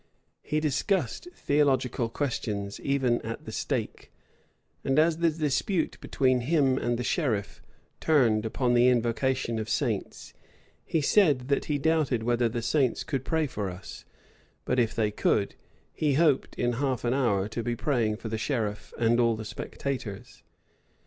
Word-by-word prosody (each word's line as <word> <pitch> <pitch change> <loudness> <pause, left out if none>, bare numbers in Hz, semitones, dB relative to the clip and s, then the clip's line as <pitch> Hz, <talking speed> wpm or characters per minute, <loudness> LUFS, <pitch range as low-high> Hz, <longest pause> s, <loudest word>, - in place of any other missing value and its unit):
He 150 +1 -1
discussed 155 - -1
theological 130 -5 +1
questions 105 -7 -3
even 130 -4 +1
at 115 +1 -6
the - - -6
stake; - - -3 0.7
and 135 - +1
as 160 +1 +4
the 170 0 +3
dispute 155 +3 -1
between 130 -2 +1
him 135 -1 +2
and 120 0 0
the 125 - -3
sheriff 115 - -1 0.4
turned 120 -9 +3
upon 120 +2 0
the 120 +1 +5
invocation 120 0 +1
of 110 - -4
saints, - - -2 0.5
he 160 - 0
said, 145 -6 +3
that 140 - +1
he 150 - 0
doubted 145 -6 +1
whether 120 0 +2
the 115 +1 -4
saints 130 0 +1
could 135 -5 -3
pray 160 +2 0
for 105 -8 -3
us; 90 +1 -9 0.6
but 125 - +1
if 115 -2 +1
they 110 -2 +1
could, 100 -1 +1 0.4
he 150 -2 +1
hoped 150 -3 +2
in 120 0 0
half 130 -4 0
an 120 0 +1
hour 110 -8 +1
to 115 +2 -3
be 120 +1 -2
praying 115 -5 0
for 115 - -7
the 110 0 -3
sheriff 110 -5 -3
and 120 +1 +2
all 115 -1 +3
the 110 0 -7
spectators. 120 -3 -6
125 Hz, 155 wpm, -27 LUFS, 115-145 Hz, 0.7 s, the